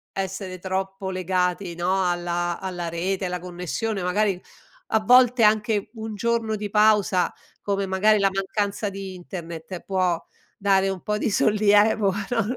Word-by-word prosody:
essere 190 -1 -4
troppo 190 +1 -3
legati, 185 0 -1
no, 185 +2 +1
alla 175 0 -2
alla 175 -3 -4
rete, 185 +3 -2
alla 180 0 -3
connessione, 180 +3 -4
magari 190 0 +1 0.5
a 220 - +2
volte 250 +2 +5
anche 210 -1 +2
un 220 0 -6
giorno 230 0 0
di 210 0 -4
pausa, 210 -2 +3 0.3
come 200 -1 -1
magari 210 +3 +3
la 195 0 +3
mancanza 200 +2 -2
di 195 -1 -7
internet, 170 0 -7
può 185 -3 0 0.4
dare 195 -1 +2
un 190 -2 -4
po' 210 0 -1
di 215 - -1
sollievo, 205 -1 +3 0.2
non 230 -4 0
195 Hz, 145 wpm, -24 LUFS, 180-210 Hz, 0.5 s, volte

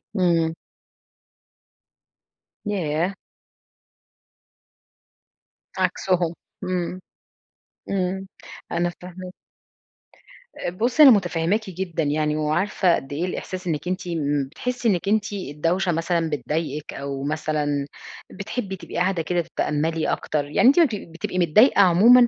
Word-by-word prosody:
إمم. 165 -4 +2 2.1
ياه! 180 -2 -1 2.6
عكسُهم. 180 -2 +1 0.3
إمم، 180 -1 -2 0.9
إمم، 190 0 -1 0.5
أنا 175 0 +1
فاهماكِ. 185 0 -9 1.2
آآ، - - -2
بُصي 235 - +3
أنا 270 - +11
مُتفهماكِ 195 +1 +1
جدًا 175 -3 -3
يعني، 150 +1 0
وعارفة 170 +4 +2
قد 135 +1 -6
إيه 160 +5 -1
الإحساس 185 0 -5
إنك 160 +1 -2
أنتِ 185 0 -3
إمم، 145 -4 0
بتحسي 250 +4 -2
إنِّك 190 -2 +1
أنتِ 210 0 +1
الدوشة 175 +1 -1
مثلًا 165 0 0
بتضايقك 150 +2 -3
أو 140 0 -5
مثلًا 150 -1 -1 0.4
بتحبي 200 0 -4
تبقي 185 - -10
قاعدة 180 0 +1
كده 175 +2 0
تتأملي 160 0 -1
أكتر، 145 -2 -1
يعني 150 +11 +3
أنت 280 +6 +6
ما 335 - +7
بتب 210 - -5
بتبقي 170 +2 -3
متضايقة 190 - +5
عمومًا، 225 +7 +7
175 Hz, 110 wpm, -23 LUFS, 155-190 Hz, 2.6 s, أنا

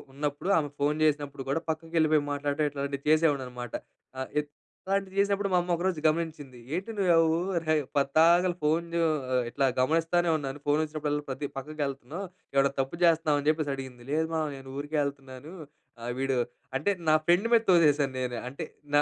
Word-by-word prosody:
ఉన్నప్పుడు, 145 +6 -2
ఆమె 145 -3 -1
ఫోన్ 150 +2 +1
చేసినప్పుడు 145 -2 -1
కూడా, 165 +3 0
పక్కకెళిపోయి 155 -2 +1
మాట్లాడడం, 145 +1 0
ఇట్లాంటిది 140 0 -4
చేసేవాడిననమాట.ఆ! 130 -4 -1 0.2
ఇత్ 145 - -17 0.4
లాంటివి 195 0 -1
చేసినప్పుడు, 200 0 +2
మా 180 - +3
అమ్మ 175 0 -2
ఒకరోజు 175 -1 -1
గమనించింది. 155 -5 -2 0.2
"ఏంటి 190 +6 -3
నువ్వు 185 -3 +3
అవూర్ 165 +2 +2
హై 155 - +5 0.2
పద్దాకల 165 +6 +4
ఫోన్ 160 +3 +2
జూ 170 - +1 0.4
ఆహ్, 125 - +3
ఇట్లా 140 +2 0
గమనిస్తానే 165 +5 +2
ఉన్నాను. 140 0 -5
ఫోనొచ్చినప్పుడల్లా 150 0 0
ప్రతి 135 +2 -3
పక్కకెళ్తన్నావు. 145 +4 -4 0.3
ఏమైనా 140 0 +4
తప్పు 135 +6 -2
జేస్తన్నావా?" 160 -3 +4
అని 145 - -5
జెప్పేసడిగింది. 135 -5 -1
"లేదుమా! 160 +1 0
నేను 135 -1 -11
ఊరికే 150 +1 -2
ఎళ్తన్నాను. 140 +2 -8 0.5
ఆహ్, 120 +1 -3
వీడు 135 -1 0 0.4
అంటే, 180 +9 +1 0.2
నా 155 - +6
ఫ్రెండ్ 180 +7 +3
మీద 230 - +6
తోసేసాను 145 -5 +4
నేను. 125 -1 -2
అంటే 140 - -6 0.3
నా 145 - +7
150 Hz, 155 wpm, -28 LUFS, 140-165 Hz, 0.5 s, నా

